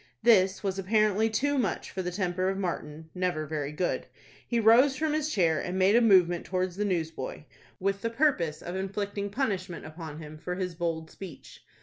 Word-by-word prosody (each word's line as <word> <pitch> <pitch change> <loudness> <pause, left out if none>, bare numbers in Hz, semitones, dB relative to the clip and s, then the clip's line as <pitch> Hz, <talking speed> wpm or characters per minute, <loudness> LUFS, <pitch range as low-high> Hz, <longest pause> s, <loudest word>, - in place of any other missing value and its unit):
This 195 -4 +4
was 195 -1 -1
apparently 215 +2 +2
too 280 +6 +1
much 200 -8 -2
for 190 - -3
the 180 - -2
temper 185 0 -1
of 195 - -2
Martin, 160 -4 -4
never 180 -4 -1
very 150 -1 -3
good. 175 +4 -2 0.4
He 235 - +1
rose 240 +5 +6
from 310 +2 0
his 310 0 0
chair, 165 - +2
and 180 +1 -3
made 190 +3 +4
a 240 - +6
movement 180 -6 +5
towards 185 -1 -2
the 210 +2 -1
newsboy, 160 -8 -3 0.4
with 195 +1 -1
the 230 - -1
purpose 230 - +1
of 175 - -5
inflicting 200 +1 -3
punishment 195 -7 -2
upon 155 -1 -8
him 155 -1 -9
for 180 +3 -4
his 180 -1 -3
bold 165 -2 -3
speech. 185 -7 -11
185 Hz, 190 wpm, -28 LUFS, 170-210 Hz, 0.4 s, rose